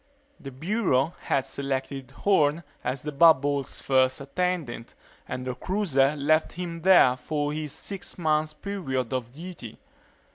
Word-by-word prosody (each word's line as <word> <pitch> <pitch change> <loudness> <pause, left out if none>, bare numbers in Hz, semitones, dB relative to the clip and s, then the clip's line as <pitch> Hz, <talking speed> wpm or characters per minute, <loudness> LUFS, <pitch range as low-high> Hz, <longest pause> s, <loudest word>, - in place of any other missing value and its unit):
The 135 - -8
Bureau 160 - 0
had 135 - 0
selected 135 -1 -4
Horne 155 0 +2 0.2
as 130 +1 -3
the 150 - -3
bubble's 145 -2 +3
first 130 -1 +2
attendant 145 -4 -3 0.3
and 125 0 -5
the 130 - -2
cruiser 150 -4 +1
left 155 +2 +2
him 170 -1 -5
there 175 -8 +6
for 145 +3 -2
his 155 -1 -4
six 195 +4 -7
months' 155 -2 +1
period 135 - -3
of 120 -2 -3
duty. 160 -6 -9
145 Hz, 135 wpm, -26 LUFS, 130-170 Hz, 0.3 s, there